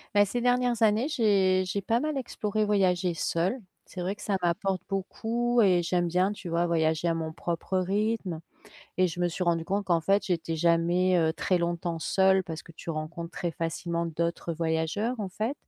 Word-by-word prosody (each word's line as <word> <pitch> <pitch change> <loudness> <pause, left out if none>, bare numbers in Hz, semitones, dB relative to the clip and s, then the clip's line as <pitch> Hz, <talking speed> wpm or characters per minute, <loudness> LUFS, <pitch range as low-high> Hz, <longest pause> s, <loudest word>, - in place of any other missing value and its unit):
Bah, 205 - +7
ces 240 +5 -2
dernières 245 -1 +1
années 220 +6 +3
j'ai 195 -8 +3
j'ai 200 +2 -2
pas 225 +5 +1
mal 305 0 -2
exploré, 215 -4 -2
voyagé 185 -4 +2
seule. 175 +8 -1 0.3
C'est 185 - -10
vrai 185 +3 -2
que - - -15
ça 200 -2 0
m'apporte 180 +2 0
beaucoup 230 +5 0
et 180 -4 +4
j'aime 175 0 +1
bien, 180 +4 +2
tu 200 - -8
vois, 170 +1 +1
voyager 160 0 +1
à - - +2
mon 160 -1 -3
propre 170 +3 -2
rythme. 200 -2 -1 0.6
Et 185 0 +4
je 175 +1 -6
me 175 - +2
suis 180 +2 -3
rendue 165 -1 +1
compte 200 +1 -1
qu'en 170 -2 +3
fait, 195 +5 +2
j'étais 165 -3 -1
jamais, 175 +2 +3
heu, 160 -1 +2
très 185 0 +1
longtemps 170 -1 -2
seule 190 +2 +3
parce 160 -1 -6
que 165 - -14
tu 165 - -10
rencontres 165 +2 -5
très 175 -1 -3
facilement 170 +1 -2
d'autres 170 +1 -2
voyageurs, 165 +9 -1
en 200 - -2
fait 220 +8 -2
180 Hz, 195 wpm, -28 LUFS, 170-205 Hz, 0.6 s, Bah